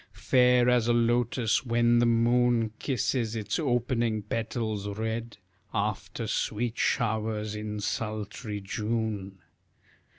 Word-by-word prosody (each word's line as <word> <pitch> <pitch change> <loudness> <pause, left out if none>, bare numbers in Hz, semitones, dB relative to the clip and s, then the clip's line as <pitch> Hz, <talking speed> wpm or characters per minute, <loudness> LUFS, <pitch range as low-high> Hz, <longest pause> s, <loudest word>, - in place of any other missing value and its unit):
Fair 125 -1 +4
as 125 -2 +3
a 120 - +4
lotus 120 -1 +2
when 120 -1 +3
the 120 - +4
moon 120 -1 +3
Kisses 120 -3 -1
its 105 -2 -2
opening 120 -5 0
petals 110 -1 -3
red, 110 +2 -4 0.4
After 105 +1 -2
sweet 115 +2 -2
showers 110 -2 0
in 105 0 -4
sultry 105 0 -4
June! 105 -1 -3
115 Hz, 105 wpm, -28 LUFS, 105-120 Hz, 0.4 s, Fair